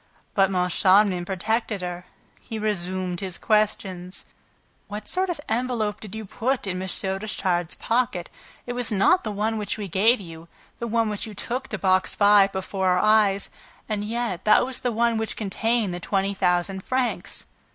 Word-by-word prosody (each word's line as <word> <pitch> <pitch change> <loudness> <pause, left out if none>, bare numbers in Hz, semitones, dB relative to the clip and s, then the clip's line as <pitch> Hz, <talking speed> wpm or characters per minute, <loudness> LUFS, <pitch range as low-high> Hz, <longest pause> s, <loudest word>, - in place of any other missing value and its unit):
But 195 -1 +4
Moncharmin 185 0 +3
protected 210 +2 -1
her. 180 0 -5 0.4
He 225 - -6
resumed 185 -4 -2
his 185 -3 -4
questions: 195 -4 0 0.6
"What 210 0 -6
sort 375 0 0
of 345 - -2
envelope 225 -3 -1
did 215 -1 -8
you 220 0 -5
put 250 +6 -1
in 185 -1 -2
M. 190 - -4
Richard's 190 -3 -1
pocket? 225 -7 0 0.4
It 245 - -4
was 245 -2 -2
not 210 - +4
the 220 - -3
one 215 +2 -1
which 210 - -2
we 205 -2 -4
gave 210 +7 +3
you, 165 -3 -10 0.3
the 235 - -3
one 230 0 +1
which 210 +1 -3
you 215 - -9
took 245 +6 -3
to 215 - -4
Box 185 0 +2
Five 205 -1 +6
before 190 0 -2
our 180 0 +4
eyes; 210 -2 +3 0.4
and 210 -2 -2
yet 225 -4 -2
that 215 - +5
was 260 -1 -5
the 245 - 0
one 230 0 +2
which 220 - -3
contained 220 0 0
the 175 - -4
twenty 195 +2 0
thousand 190 0 0
francs." 255 -1 -1
205 Hz, 170 wpm, -24 LUFS, 185-225 Hz, 0.6 s, Five